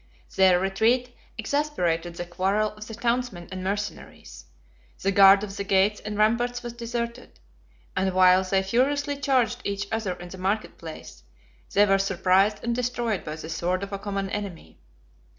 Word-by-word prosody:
Their 185 -2 +5
retreat 230 +6 +1 0.2
exasperated 180 - -1
the 175 - -5
quarrel 195 +4 0
of 215 0 -11
the 225 - -7
townsmen 235 -6 -2
and 185 0 -5
mercenaries; 190 - -5 0.6
the 195 - +2
guard 195 0 +7
of 200 -2 -6
the 200 - -2
gates 200 +1 +2
and 210 -1 -6
ramparts 240 +3 +1
was 240 -1 -6
deserted; 235 +1 -5 0.6
and 190 0 +1
while 185 0 +6
they 190 +1 +1
furiously 280 +8 +1
charged 250 -3 +1
each 200 0 -2
other 220 -4 -1
in 175 0 -10
the 185 - -10
market 200 +4 -2
place, 160 -2 -10 0.5
they 205 +1 +6
were 195 -1 +3
surprised 195 +2 +2
and 235 - 0
destroyed 240 -4 -1
by 155 - -5
the 160 0 -8
sword 175 +3 -1
of 200 0 -6
a 200 - -3
common 195 -1 -3
enemy. 200 -5 -6
200 Hz, 165 wpm, -25 LUFS, 185-235 Hz, 0.6 s, guard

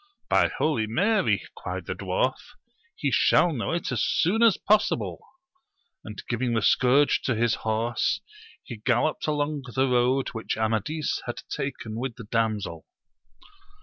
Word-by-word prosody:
By - - +5
Holy 125 -9 0
Mary, 200 - +1
cried - - -6
the - - -3
dwarf, - - 0 0.6
he - - -1
shall 175 -2 +4
know 120 - -2
it 170 -3 -2
as 120 -3 0
soon 200 +7 +1
as 230 -4 +5
possible! 215 0 +1 0.8
and 105 -2 -8
giving 120 0 -1
the 110 - 0
scourge 135 +3 +4
to 130 - 0
his 115 0 +2
horse, 110 +2 0 0.4
he 120 - -8
galloped 120 +9 0
along 145 -1 -1
the 135 0 +3
road 125 +1 +2
which 115 -1 -4
Amadis 110 +8 -1
had 120 - -4
taken 130 -5 -5
with 125 -2 -4
the 115 - -9
damsel. 110 -2 -2
125 Hz, 145 wpm, -26 LUFS, 115-150 Hz, 0.8 s, By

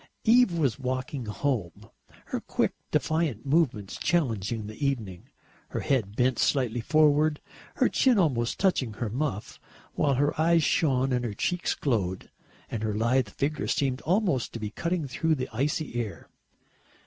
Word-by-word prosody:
Eve 235 -4 +5
was 140 -4 +1
walking 130 -1 -3
home, 105 - -2 0.4
her - - -3
quick, - - -1 0.2
defiant 155 -9 0
movements 135 - +1
challenging 115 - 0
the 110 +7 -7
evening, 110 -11 -2 0.4
her - - -3
head 110 -7 0
bent 125 0 +2
slightly 125 -4 +1
forward, 150 +2 +3 0.4
her - - +3
chin 255 -4 +3
almost 130 -10 +1
touching 150 - +1
her 105 0 -4
muff, 125 -4 -3 0.3
while 140 -2 +2
her 145 +3 +2
eyes 165 0 +4
shone 135 -5 +2
and 125 -1 0
her 110 -4 -3
cheeks 180 - -1
glowed 100 -9 -2 0.4
and 110 - -3
her 110 -1 -1
lithe 115 +1 +2
figure 145 +8 -2
seemed 135 -3 0
almost 175 - +1
to 115 - -5
be 105 -1 -4
cutting 170 0 -2
through 160 +5 0
the 130 -2 -3
icy 145 +5 -1
air. 110 -4 -7
130 Hz, 150 wpm, -27 LUFS, 115-155 Hz, 0.4 s, Eve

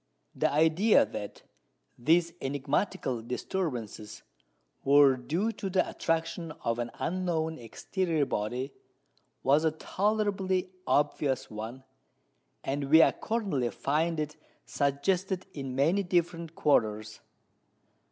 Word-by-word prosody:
The - - +1
idea 160 - +4
that 105 -1 -7 0.5
these 165 +6 +2
enigmatical 140 - -1
disturbances 120 - -4 0.6
were 140 -1 +6
due 160 - -1
to 200 -2 -5
the 185 0 +2
attraction 165 0 -2
of 115 0 0
an 120 0 -2
unknown 165 -4 -1
exterior 160 - -1
body 125 +5 -3 0.7
was 145 +4 +4
a 160 - +4
tolerably 190 +1 -1 0.2
obvious 145 -2 +1
one; 110 +5 -7 0.8
and 140 +1 -2
we 160 +4 +7
accordingly 195 - 0
find 160 +6 0
it 150 0 -3 0.3
suggested 180 +7 0
in 135 -3 -5
many 165 +9 +3
different 170 -3 -1
quarters. 110 -6 +1
155 Hz, 105 wpm, -29 LUFS, 130-180 Hz, 0.8 s, we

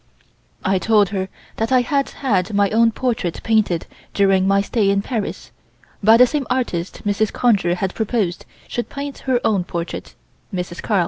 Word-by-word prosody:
I 190 0 +2
told 210 -2 +3
her 190 -1 -3 0.3
that 225 +2 -1
I 255 -1 +5
had 275 +3 0
had 205 -6 -1
my 200 -1 +3
own 230 +1 +4
portrait 230 -8 -2
painted 215 -7 +1 0.3
during 195 -1 +3
my 195 0 +4
stay 205 -1 +1
in 200 0 +1
Paris, 225 -4 -4 0.5
by 220 +3 +7
the 250 - +8
same 280 +1 -2
artist 235 -9 -2
Mrs. 205 +1 +1
Conger 195 -8 +2
had 190 +1 -2
proposed 215 -5 -1 0.2
should 240 - -4
paint 280 0 -6
her 250 -2 +3
own 200 -5 +2
portrait 170 -1 -5 0.4
(Miss 180 -2 -4
Carl). 210 -3 +1
205 Hz, 170 wpm, -20 LUFS, 190-240 Hz, 0.5 s, the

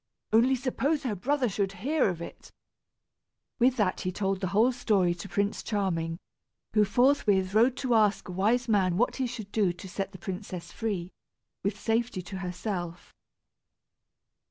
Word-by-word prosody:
"Only 245 +4 +5
suppose 275 +4 -1
her 245 -5 -1
brother 255 +7 0
should 195 -1 -1
hear 265 - +1
of 170 -2 -4
it." - - -11 1.1
With 250 +2 +4
that 200 -5 +1
he 185 - -2
told 195 0 -1
the 190 - 0
whole 215 +7 +3
story 205 -8 +2
to 175 +3 -9
Prince 200 0 0
Charming, 170 -6 -1 0.6
who 215 -1 +5
forthwith 205 -4 +3
rode 240 +4 +4
to 260 -3 0
ask 215 -2 +3
a - - -6
wise 220 +7 +1
man 190 -5 +2
what 245 +4 +1
he 260 -2 0
should 225 -4 -7
do 205 -5 +2
to 185 +2 -10
set 195 +2 -4
the - - -10
princess 180 -2 -6
free, 190 -6 -3 0.5
with 200 +1 -2
safety 225 -4 -1
to 190 +2 -7
herself. 180 -2 -5
205 Hz, 160 wpm, -28 LUFS, 185-240 Hz, 1.1 s, Only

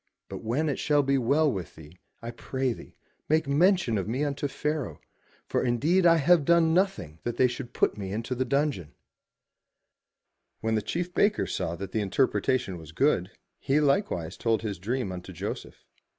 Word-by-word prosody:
But - - -6
when 130 +8 0
it 145 - -1
shall 145 -1 +2
be 135 0 +2
well 140 +5 +3
with 95 -6 -6
thee, 80 +2 -14 0.2
I 115 - -4
pray 130 +1 -2
thee, - - -13 0.3
make 155 -1 +2
mention 150 - +3
of 95 - -4
me 125 +6 -1
unto 145 0 -1
Pharaoh, 150 0 -3 0.5
for - - -1
indeed 155 +10 +3
I 165 - +7
have 165 +1 +4
done 165 +1 +4
nothing 135 - 0
that 120 - -4
they 130 - +5
should 120 0 -3
put - - 0
me 95 -1 -4
into 115 +5 -3
the 130 +1 0
dungeon/' 140 - -1 1.7
When 110 0 -1
the 110 - +1
chief 175 - -3
baker 210 +1 +2
saw 85 - -3
that 95 +2 -7
the 110 - 0
interpretation 110 -2 0
was 80 -1 -11
good, 95 - +2 0.3
he 140 +2 +1
likewise 140 - 0
told 115 -1 0
his 100 -5 -4
dream 115 +1 -2
unto 90 -1 -7
Joseph. - - -6
130 Hz, 180 wpm, -27 LUFS, 105-150 Hz, 1.7 s, I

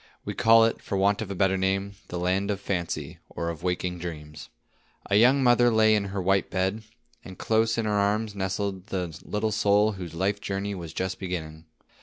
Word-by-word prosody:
We - - -3
call 115 0 +6
it, 115 - -1
for 100 - -3
want 100 +2 +2
of 110 - -5
a 100 - -4
better 95 +1 +2
name, 95 +1 0
"The 90 - -5
land 95 +3 0
of 100 -2 -1
fancy, 90 -4 -4
or 85 - -4
of 80 -3 -6
waking 90 0 -2
dreams." 75 -3 -8 0.6
A - - +4
young 130 +6 +5
mother 120 -1 +5
lay 110 -1 +4
in 105 -2 +1
her 100 0 -4
white 95 +1 +1
bed, 95 +4 -1 0.4
and 95 - -11
close 110 0 +1
in 115 - 0
her 105 - 0
arms 105 +1 +1
nestled 95 0 -3
the 90 -5 -3
little 110 +1 -2
soul 105 0 +3
whose 90 -5 -8
life 100 +4 -1
journey 100 +1 -3
was 85 -4 -7
just 95 +3 -3
beginning. 80 -4 -5
100 Hz, 200 wpm, -26 LUFS, 90-105 Hz, 0.6 s, call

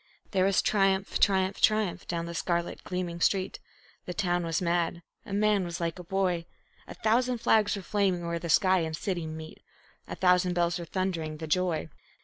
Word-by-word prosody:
There 190 -1 +2
was 195 -1 +3
triumph, 195 -1 +1
triumph, 190 0 +2
triumph 215 -4 +2
down 170 -1 -2
the 170 - -6
scarlet 170 0 -2
gleaming 175 -2 -4
street; 190 0 +1 0.5
The 180 - -5
town 175 -4 0
was 165 -1 -1
mad; 170 -1 0 0.2
a - - -8
man 205 -1 +2
was 170 -1 -5
like 170 +1 -2
a - - -7
boy. 180 -2 -1 0.4
A - - -9
thousand 245 +3 +1
flags 215 -2 +3
were 200 - -6
flaming 190 -3 0
where 170 0 -2
the 170 - -6
sky 185 +2 +4
and 160 -1 -2
city 175 -4 -3
meet; 160 0 -8 0.5
A - - -5
thousand 180 -1 +3
bells 175 0 +1
were 170 - -5
thundering 165 -4 -2
the 160 - -6
joy. 170 0 0
180 Hz, 185 wpm, -28 LUFS, 170-195 Hz, 0.5 s, sky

